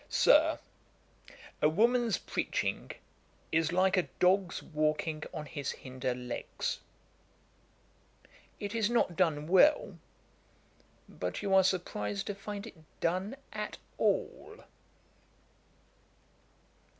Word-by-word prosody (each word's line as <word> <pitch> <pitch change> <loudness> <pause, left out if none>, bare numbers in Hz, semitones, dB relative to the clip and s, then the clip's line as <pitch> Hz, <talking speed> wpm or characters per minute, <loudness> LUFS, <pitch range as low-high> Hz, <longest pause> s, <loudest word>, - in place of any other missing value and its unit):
'Sir, - - +5 1.0
a 150 - +5
woman's 235 +5 +3
preaching - - -2 0.6
is 160 0 +2
like 185 +1 +3
a 185 - +1
dog's 185 0 +2
walking 155 0 -1
on 155 -1 -5
his 145 -2 -4
hinder 130 -1 -4
legs. 125 -1 -4 1.8
It 205 +1 -4
is 225 -2 +1
not 235 -7 +2
done 160 -5 +1
well; 190 - +4 1.1
but - - -5
you 195 -1 0
are 190 0 +7
surprized 105 - -1
to 205 - -3
find 200 +1 -6
it 225 - -11 0.2
done 185 +8 -1 0.2
at 210 0 -4 0.2
all.' 485 -2 -1
185 Hz, 100 wpm, -31 LUFS, 155-205 Hz, 1.8 s, are